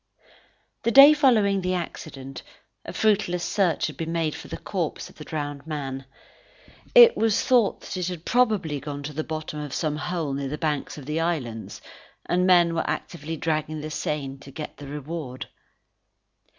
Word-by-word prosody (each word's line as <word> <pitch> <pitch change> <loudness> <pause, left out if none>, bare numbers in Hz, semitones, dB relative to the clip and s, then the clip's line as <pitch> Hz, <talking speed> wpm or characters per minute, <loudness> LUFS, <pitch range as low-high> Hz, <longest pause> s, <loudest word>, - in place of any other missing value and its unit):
The - - +1
day 275 +5 +10
following 220 -10 +3
the 185 0 0
accident, 135 -6 -6 0.4
a - - -5
fruitless 200 -5 +1
search 185 -4 +1
had 150 -3 -5
been 165 +1 -3
made 165 -2 0
for - - -9
the - - -6
corpse - - -4
of - - -23
the - - -8
drowned 145 -1 -5
man. 135 -3 -4 0.9
It 480 -1 +9
was 225 -2 +2
thought 240 -6 +3
that - - -7
it 180 -1 -2
had 175 -3 -6
probably 210 - +1
gone 145 0 -6
to 150 +1 -6
the 155 +2 -2
bottom 155 -1 -5
of 150 -2 -5
some 150 -2 -1
hole 160 -3 -2
near 140 0 -3
the 150 - -4
banks 150 -2 -2
of 145 - -9
the 150 +3 -2
islands, 135 -10 -3 0.4
and 180 +1 +1
men 175 -2 +5
were 165 - -1
actively 165 -1 -4
dragging 155 -1 -2
the 155 +1 -6
Seine 140 -2 -3
to 140 - -13
get 150 +2 -7
the 145 - -9
reward. 145 -2 -6
155 Hz, 175 wpm, -25 LUFS, 145-180 Hz, 0.9 s, day